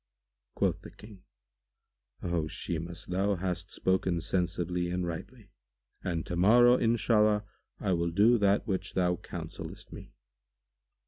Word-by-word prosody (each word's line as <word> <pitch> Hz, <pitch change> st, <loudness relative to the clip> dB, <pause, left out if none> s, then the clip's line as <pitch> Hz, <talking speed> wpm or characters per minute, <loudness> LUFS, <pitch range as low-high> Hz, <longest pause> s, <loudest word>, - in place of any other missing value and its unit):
Quoth -, -, 0 dB
the -, -, -10 dB
King, 105 Hz, -3 st, -15 dB, 1.0 s
"O 85 Hz, -3 st, -1 dB
Shimas, 85 Hz, -1 st, -5 dB
thou 95 Hz, +3 st, 0 dB
hast 90 Hz, 0 st, -3 dB
spoken 95 Hz, -2 st, 0 dB
sensibly 90 Hz, 0 st, -1 dB
and 90 Hz, 0 st, -1 dB
rightly; 100 Hz, +5 st, -7 dB, 0.5 s
and 85 Hz, -2 st, -2 dB
to 90 Hz, -, -4 dB
morrow, 120 Hz, +7 st, +6 dB
Inshallah, 110 Hz, -3 st, +3 dB, 0.4 s
I 95 Hz, -, 0 dB
will 85 Hz, 0 st, 0 dB
do 105 Hz, +7 st, +4 dB
that 100 Hz, 0 st, +3 dB
which 95 Hz, -2 st, -3 dB
thou 90 Hz, -1 st, +2 dB
counsellest -, -, -8 dB
me." -, -, -11 dB
95 Hz, 125 wpm, -30 LUFS, 85-105 Hz, 1.0 s, morrow